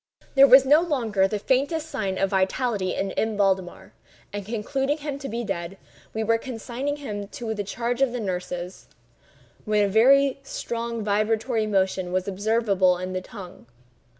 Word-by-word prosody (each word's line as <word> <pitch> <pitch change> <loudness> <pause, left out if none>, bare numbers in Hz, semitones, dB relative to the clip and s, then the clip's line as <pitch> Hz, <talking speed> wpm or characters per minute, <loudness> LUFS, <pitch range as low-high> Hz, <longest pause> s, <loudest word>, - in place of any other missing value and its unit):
There 275 0 +8
was 265 0 +8
no 295 +4 +6
longer 230 - +1
the 210 - -2
faintest 285 +8 0
sign 190 -11 -3
of 195 - 0
vitality 195 0 0
in 195 0 -2
M. 220 +1 -1
Valdemar; 190 -3 -1 0.4
and 205 0 -4
concluding 270 +7 -2
him 290 -2 -5
to 275 - -6
be 235 +2 -3
dead, 190 -3 -4 0.3
we 220 - -2
were 230 +1 +2
consigning 255 +4 -4
him 210 -8 -6
to 220 +1 -5
the 205 -1 -3
charge 235 +5 -3
of 270 -3 +3
the 245 - -4
nurses, 180 -2 -5 0.8
when 210 -2 +1
a 275 +4 +5
strong 235 -4 -4
vibratory 215 +2 0
motion 190 -3 0
was 185 +1 -1
observable 200 -2 +2
in 185 +1 -5
the 185 - -2
tongue. 185 - -11
220 Hz, 160 wpm, -25 LUFS, 195-255 Hz, 0.8 s, There